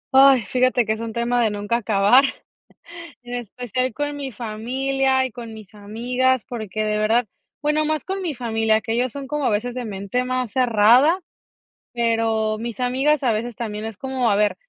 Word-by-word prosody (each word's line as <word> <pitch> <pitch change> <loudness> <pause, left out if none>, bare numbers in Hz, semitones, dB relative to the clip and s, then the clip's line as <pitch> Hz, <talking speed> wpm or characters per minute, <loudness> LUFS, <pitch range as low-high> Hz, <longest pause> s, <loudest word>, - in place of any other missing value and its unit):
Ay, 270 -3 +7
fíjate 255 +3 +2
que 215 - +1
es 220 - -6
un 230 -1 -4
tema 235 +1 0
de 220 - +2
nunca 205 +3 -1
acabar, 220 +3 +4 1.0
en 245 0 -10
especial 245 +1 -3
con 290 +2 -3
mi 280 -2 -5
familia 260 +4 -1
y 260 - -3
con 230 -1 -8
mis 215 -2 -13
amigas, 245 +4 0
porque 215 -4 -4
de 210 0 0
verdad, 225 +3 +2 0.4
bueno, 300 +1 +1
más 310 -1 -1
con 385 +1 -3
mi 345 -5 -3
familia, 225 -3 0
que 225 0 -3
ellos 245 +2 0
son 280 +2 -7
como 295 0 -2
a - - +4
veces 230 +4 -1
de 250 -2 -4
mente 200 +4 -2
más 255 -2 -2
cerrada, 250 - +4 0.8
pero 225 -2 0
mis 235 +1 -6
amigas 265 +4 +1
a 245 - +3
veces 225 +2 -3
también 215 -3 -5
es 225 -3 -7
como, 260 -3 -1
a 205 - +3
ver, 210 0 +2
240 Hz, 190 wpm, -22 LUFS, 220-260 Hz, 1.0 s, Ay